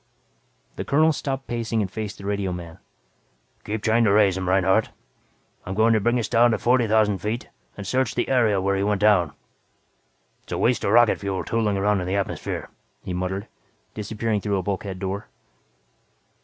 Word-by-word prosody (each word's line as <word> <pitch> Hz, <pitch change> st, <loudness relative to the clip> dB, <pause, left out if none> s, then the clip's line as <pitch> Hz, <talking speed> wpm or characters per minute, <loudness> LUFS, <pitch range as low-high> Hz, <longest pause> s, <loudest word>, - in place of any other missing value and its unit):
The -, -, -3 dB
colonel 155 Hz, +3 st, +3 dB
stopped 135 Hz, -1 st, -4 dB
pacing 115 Hz, -1 st, -2 dB
and 95 Hz, -, -5 dB
faced 110 Hz, -1 st, -5 dB
the 100 Hz, -, -10 dB
radioman. 90 Hz, -5 st, -3 dB, 0.8 s
"Keep 105 Hz, 0 st, -4 dB
trying 115 Hz, +1 st, +3 dB
to 105 Hz, -, +4 dB
raise 100 Hz, -2 st, +4 dB
him, 95 Hz, -1 st, -2 dB
Reinhardt. 95 Hz, 0 st, +3 dB, 0.7 s
I'm 95 Hz, -, -5 dB
going 110 Hz, +2 st, +4 dB
to 110 Hz, -, +3 dB
bring 120 Hz, +4 st, +1 dB
us 115 Hz, -, -1 dB
down 120 Hz, +1 st, +4 dB
to 115 Hz, -, +1 dB
forty 125 Hz, -1 st, +2 dB
thousand 105 Hz, -2 st, +2 dB
feet 110 Hz, +6 st, -4 dB, 0.3 s
and 100 Hz, -, -6 dB
search 130 Hz, +2 st, 0 dB
the 120 Hz, -, 0 dB
area 115 Hz, -6 st, +3 dB
where 100 Hz, +1 st, 0 dB
he 95 Hz, -, -1 dB
went 100 Hz, 0 st, 0 dB
down. 95 Hz, -8 st, +4 dB, 1.1 s
Helluva -, -, -3 dB
waste 125 Hz, +1 st, +2 dB
of 100 Hz, -, +1 dB
rocket 120 Hz, 0 st, +5 dB
fuel 100 Hz, -2 st, -3 dB
tooling 110 Hz, -3 st, 0 dB
around 100 Hz, 0 st, +1 dB
in 90 Hz, -, -4 dB
the 95 Hz, -, -1 dB
atmosphere," 100 Hz, -1 st, -3 dB, 0.3 s
he 90 Hz, -, -5 dB
muttered, 90 Hz, +3 st, -3 dB, 0.5 s
disappearing 110 Hz, 0 st, -2 dB
through 100 Hz, -1 st, -1 dB
a 95 Hz, -, -2 dB
bulkhead 95 Hz, 0 st, -3 dB
door. 95 Hz, +2 st, -4 dB
105 Hz, 180 wpm, -24 LUFS, 95-115 Hz, 1.1 s, rocket